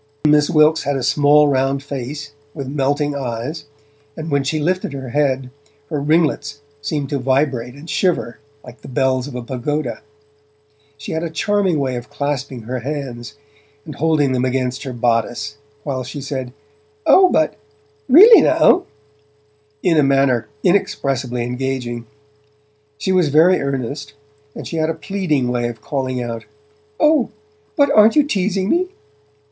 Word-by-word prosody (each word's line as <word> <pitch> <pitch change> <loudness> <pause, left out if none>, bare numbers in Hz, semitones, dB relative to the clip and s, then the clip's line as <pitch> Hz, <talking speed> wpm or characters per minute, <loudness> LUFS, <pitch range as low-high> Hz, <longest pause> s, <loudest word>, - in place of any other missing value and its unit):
Miss 150 0 +4
Wilkes 155 -1 +4
had 145 0 -1
a 135 - -2
small, 145 +3 +4
round 135 0 0
face, 140 +1 -6 0.2
with 140 -4 -5
melting 145 +1 0
eyes, 135 +4 -4 0.5
and 160 0 -5
when 140 -1 +2
she 155 +3 -1
lifted 180 0 -1
her 135 -2 -6
head, 135 -1 0 0.4
her 150 -2 -1
ringlets 145 -2 0 0.2
seemed 145 -1 -2
to 140 - -1
vibrate 130 -2 0
and 145 +3 -12
shiver 170 -10 -1 0.2
like 125 0 -13
the - - -11
bells 130 0 0
of 140 - -9
a 125 - -5
pagoda. 135 +5 -3 1.0
She 140 - -7
had 160 - -2
a 170 - -3
charming 190 +2 0
way 130 -3 -1
of 120 - -8
clasping 140 -4 -4
her 125 +3 -4
hands, 130 -3 -6 0.5
and 155 - -7
holding 150 -3 +1
them 130 -1 0
against 130 0 -1
her 130 - -4
bodice, 115 0 -1 0.3
while 130 -3 -3
she 140 +4 -7
said, 135 -2 -5 0.5
'Oh, 375 -1 +6
but 155 - +1 0.5
really 410 - +9
now?' 365 - +4 1.0
in 170 -3 +3
a - - +6
manner 135 -4 +2 0.2
inexpressibly 135 -9 0
engaging. 125 -1 -4 0.9
She 190 - -2
was 180 -5 +3
very 165 +6 +4
earnest, 140 +1 -4 0.4
and - - -7
she 165 - -5
had 155 0 +1
a 165 - -2
pleading 155 -5 -1
way 120 -1 0
of 120 -2 -7
calling 130 -3 -2
out: 115 -1 -6 0.5
'O, 305 -5 +3 0.5
but 285 -2 +3
aren't 215 -1 +6
you 300 - +5
teasing 195 -7 -1
me?' 355 - +1
140 Hz, 150 wpm, -19 LUFS, 130-155 Hz, 1.0 s, really